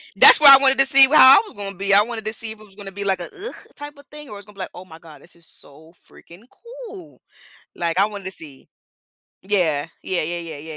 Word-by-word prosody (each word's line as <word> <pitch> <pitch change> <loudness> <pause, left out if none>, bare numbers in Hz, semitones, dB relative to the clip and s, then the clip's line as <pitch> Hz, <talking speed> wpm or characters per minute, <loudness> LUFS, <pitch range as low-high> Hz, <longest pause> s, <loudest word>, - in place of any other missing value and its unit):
That's - - +6
why 285 -2 +8
I 270 - +1
wanted 270 -1 +2
to 270 - +5
see 270 0 +5
wh 295 - -2
how 265 -1 +7
I - - -2
was 420 - -16
gonna 200 -1 -8
be, 195 +2 -4
I 200 +1 +4
wanted 225 -1 -9
to 215 - -5
see 225 0 -7
if 220 - -13
it - - -17
was 195 -2 -24
gonna 200 -1 -11
be 200 +1 -8
like 195 -1 -3
a - - -1
"ugh" 410 +4 -4 0.2
type 290 0 -12
of 285 - -19
thing, 300 -1 -13
or - - -11
it - - -10
was 200 0 -14
gonna 210 - -19
be - - -19
like, 185 - -7
"Oh 180 - -13
my 160 -3 -16
god, 155 -4 -18
this 175 - -20
is 170 -1 -16
so 155 +3 -17 0.2
freaking 175 +5 -19 0.4
cool." 375 -8 -15 0.6
Like, 170 0 -4
I 200 - +2
wanted 205 -2 -11
to 190 - -7
see 145 -7 -14 0.7
Yeah. 170 -7 -2 0.2
Yeah, 185 - -4
yeah, 170 +2 -6 0.2
yeah, 155 +2 -12
200 Hz, 280 wpm, -19 LUFS, 175-270 Hz, 0.7 s, why